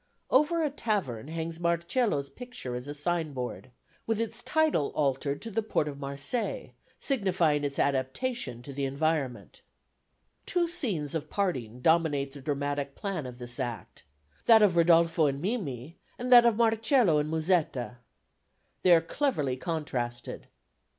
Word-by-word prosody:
Over 310 Hz, +5 st, +3 dB
a 300 Hz, -, 0 dB
tavern 195 Hz, -, -2 dB
hangs 165 Hz, +1 st, -4 dB
Marcello's 170 Hz, -, 0 dB
picture 245 Hz, -, -7 dB
as 125 Hz, +2 st, -5 dB
a 145 Hz, -, -5 dB
signboard, 145 Hz, -6 st, -3 dB, 0.4 s
with 225 Hz, -1 st, 0 dB
its 230 Hz, +1 st, -3 dB
title 310 Hz, -, +2 dB
altered 140 Hz, 0 st, 0 dB
to 230 Hz, -, -6 dB
the 225 Hz, -, 0 dB
Port 210 Hz, -8 st, 0 dB
of 140 Hz, -1 st, -6 dB
Marseilles, 140 Hz, -, -3 dB, 0.3 s
signifying 180 Hz, -, +1 dB
its 140 Hz, -1 st, -3 dB
adaptation 135 Hz, -, -1 dB
to 140 Hz, -, -8 dB
its 140 Hz, -, -8 dB
environment. 140 Hz, -1 st, -2 dB, 0.9 s
Two 350 Hz, -1 st, +1 dB
scenes 215 Hz, -, -1 dB
of 160 Hz, -3 st, -3 dB
parting 125 Hz, -, -2 dB
dominate 150 Hz, -3 st, +2 dB
the 140 Hz, -, -10 dB
dramatic 145 Hz, 0 st, -2 dB
plan 190 Hz, -9 st, -4 dB
of 125 Hz, -1 st, -9 dB
this 120 Hz, 0 st, -7 dB
Act, 120 Hz, -4 st, -5 dB, 0.5 s
that 225 Hz, -2 st, +8 dB
of 190 Hz, -4 st, +4 dB
Rodolfo 165 Hz, -2 st, +4 dB
and 140 Hz, 0 st, -2 dB
Mimi, 165 Hz, -, -4 dB, 0.2 s
and 250 Hz, +1 st, -4 dB
that 240 Hz, -1 st, +9 dB
of 225 Hz, -3 st, +2 dB
Marcello 225 Hz, -, +3 dB
and 150 Hz, +1 st, -1 dB
Musetta. 155 Hz, -, 0 dB, 0.8 s
They 180 Hz, -2 st, +7 dB
are 165 Hz, -, +4 dB
cleverly 165 Hz, -, -1 dB
contrasted. 130 Hz, -6 st, -4 dB
160 Hz, 145 wpm, -29 LUFS, 140-215 Hz, 0.9 s, that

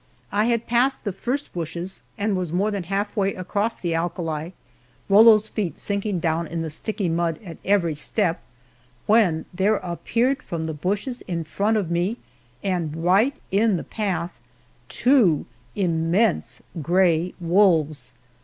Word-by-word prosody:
I 210 Hz, +2 st, +2 dB
had 235 Hz, -1 st, +1 dB
passed 250 Hz, +3 st, +2 dB
the 205 Hz, -, -1 dB
first 250 Hz, +9 st, -3 dB
bushes 170 Hz, +2 st, -5 dB, 0.2 s
and 205 Hz, 0 st, 0 dB
was 180 Hz, -3 st, -2 dB
more 195 Hz, +5 st, +1 dB
than 200 Hz, -4 st, -3 dB
half 200 Hz, +4 st, -2 dB
way 195 Hz, -2 st, +1 dB
across 205 Hz, +5 st, -2 dB
the 170 Hz, -2 st, -1 dB
alkali, 165 Hz, -1 st, -2 dB, 0.6 s
Rollo's 215 Hz, +1 st, +7 dB
feet 190 Hz, -10 st, -3 dB
sinking 200 Hz, -2 st, -2 dB
down 165 Hz, 0 st, 0 dB
in 165 Hz, +1 st, -3 dB
the 160 Hz, -, -4 dB
sticky 205 Hz, +4 st, -2 dB
mud 165 Hz, -1 st, 0 dB
at 170 Hz, -3 st, -9 dB
every 185 Hz, -5 st, +2 dB
step, 165 Hz, +3 st, -1 dB, 0.6 s
when 205 Hz, -8 st, +3 dB
there 195 Hz, +4 st, +2 dB
appeared 230 Hz, +9 st, -1 dB
from 165 Hz, -2 st, -4 dB
the 160 Hz, 0 st, -3 dB
bushes 205 Hz, -, -2 dB
in 170 Hz, -2 st, -2 dB
front 200 Hz, +8 st, 0 dB
of 185 Hz, -5 st, -2 dB
me, 180 Hz, +7 st, 0 dB, 0.5 s
and 165 Hz, -4 st, -2 dB
right 210 Hz, +10 st, +4 dB, 0.2 s
in 205 Hz, 0 st, +3 dB
the -, -, -5 dB
path, 180 Hz, -5 st, -3 dB, 0.5 s
two 240 Hz, -, +3 dB, 0.3 s
immense 175 Hz, +2 st, +1 dB, 0.2 s
gray 175 Hz, +1 st, +2 dB
wolves. 165 Hz, -7 st, +2 dB
185 Hz, 145 wpm, -23 LUFS, 165-210 Hz, 0.6 s, Rollo's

